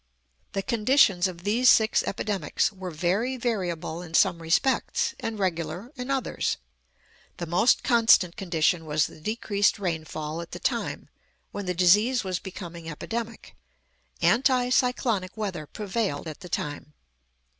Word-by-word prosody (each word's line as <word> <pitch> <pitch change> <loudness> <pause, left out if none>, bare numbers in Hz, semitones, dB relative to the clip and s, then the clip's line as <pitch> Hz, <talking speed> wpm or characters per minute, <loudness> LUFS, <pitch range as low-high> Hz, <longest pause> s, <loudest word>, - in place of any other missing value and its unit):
The 195 - -2
conditions 215 -5 +3
of 175 -2 -9
these 235 +5 +4
six 220 -1 +5
epidemics 200 -6 -1
were 190 -1 -6
very 190 +11 -1
variable 180 -8 -2
in 165 -2 -7
some 175 -3 +3
respects, 270 - +1
and 225 -1 -4
regular 185 - -3
in 250 0 -6
others. 270 -1 -1 0.8
The 170 - -4
most 175 +9 +3
constant 225 -7 +4
condition 170 -2 0
was 150 -1 +1
the 155 - -11
decreased 205 +1 +1
rainfall 160 -3 -4
at 170 - -10
the - - -6
time, - - -2 0.4
when 205 -2 -5
the 180 - -1
disease 210 +8 +4
was 185 -2 -2
becoming 170 -3 -8
epidemic. 225 +8 -6 0.7
Anti 250 0 +3
cyclonic 235 -7 +1
weather 185 -8 -4
prevailed 200 -7 -3
at 155 - -7
the 180 -3 -10
time. 150 -2 -4
190 Hz, 135 wpm, -26 LUFS, 170-230 Hz, 0.8 s, six